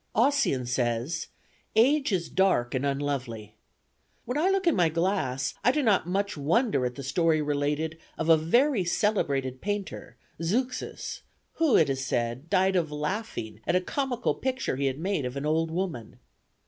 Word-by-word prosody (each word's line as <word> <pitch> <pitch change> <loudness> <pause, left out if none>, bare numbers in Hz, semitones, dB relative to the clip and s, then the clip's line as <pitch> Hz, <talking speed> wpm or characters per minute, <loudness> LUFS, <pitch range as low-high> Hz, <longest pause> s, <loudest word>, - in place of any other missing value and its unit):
Ossian 245 - +2
says, 120 +5 -1 0.5
'Age 270 +4 +4
is 175 -3 0
dark 185 -11 +2
and 130 0 -1
unlovely.' 130 -7 -3 0.7
When 250 - -3
I 325 +6 +2
look 390 0 +1
in 340 - +4
my 175 -3 +3
glass, 155 -7 -1
I 250 - +5
do 300 +2 0
not 200 -8 +3
much 200 +3 -1
wonder 160 - +1
at 125 - -7
the 140 - -7
story 160 +4 +2
related 150 +2 -1 0.2
of 160 - -2
a 165 - +8
very 230 - +2
celebrated 140 - 0
painter, 205 -1 -4 0.2
Zeuxis, 250 +9 -2 0.4
who, 315 -6 +5
it 160 - +4
is 135 -1 -2
said, 125 +4 -2
died 190 0 +3
of 165 -4 +1
laughing 150 - -4
at 175 - +2
a - - +5
comical 250 +5 -1
picture 260 - -2
he 140 +1 0
had 135 0 -2
made 185 -1 -1
of 125 +2 -4
an 140 - -3
old 160 +2 +1
woman. 165 - -4
165 Hz, 165 wpm, -27 LUFS, 135-210 Hz, 0.7 s, a